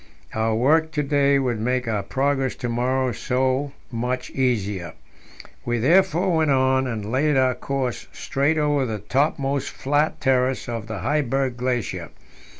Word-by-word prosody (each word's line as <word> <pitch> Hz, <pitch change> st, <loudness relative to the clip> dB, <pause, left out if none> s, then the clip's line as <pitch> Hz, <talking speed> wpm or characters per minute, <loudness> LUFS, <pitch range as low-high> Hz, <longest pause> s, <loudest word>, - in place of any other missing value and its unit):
Our 110 Hz, 0 st, 0 dB
work 160 Hz, +7 st, +3 dB
to 150 Hz, -, 0 dB
day 140 Hz, -1 st, +3 dB
would 125 Hz, -5 st, -1 dB
make 125 Hz, +2 st, -1 dB
our 105 Hz, -3 st, 0 dB
progress 135 Hz, +4 st, 0 dB
to 125 Hz, -, -4 dB
morrow 125 Hz, +2 st, 0 dB
so 130 Hz, +4 st, 0 dB, 0.2 s
much 125 Hz, +2 st, -2 dB
the 135 Hz, -, -4 dB
easier. 100 Hz, -9 st, -1 dB, 0.7 s
We 120 Hz, 0 st, -1 dB
therefore 180 Hz, -, +3 dB
went 160 Hz, -2 st, +2 dB
on, 130 Hz, -1 st, +2 dB
and 110 Hz, -3 st, -4 dB
laid 145 Hz, +3 st, +2 dB
our 130 Hz, -1 st, +3 dB
course 130 Hz, -1 st, -3 dB
straight 145 Hz, +4 st, 0 dB
over 145 Hz, -2 st, +2 dB
the 110 Hz, -4 st, -2 dB
topmost 135 Hz, +5 st, 0 dB
flat 145 Hz, +3 st, 0 dB
terrace 130 Hz, -2 st, +1 dB
of 115 Hz, -2 st, -4 dB
the 110 Hz, -4 st, -5 dB
Heiberg 135 Hz, 0 st, 0 dB
Glacier. 125 Hz, -2 st, -2 dB
130 Hz, 150 wpm, -23 LUFS, 120-140 Hz, 0.7 s, work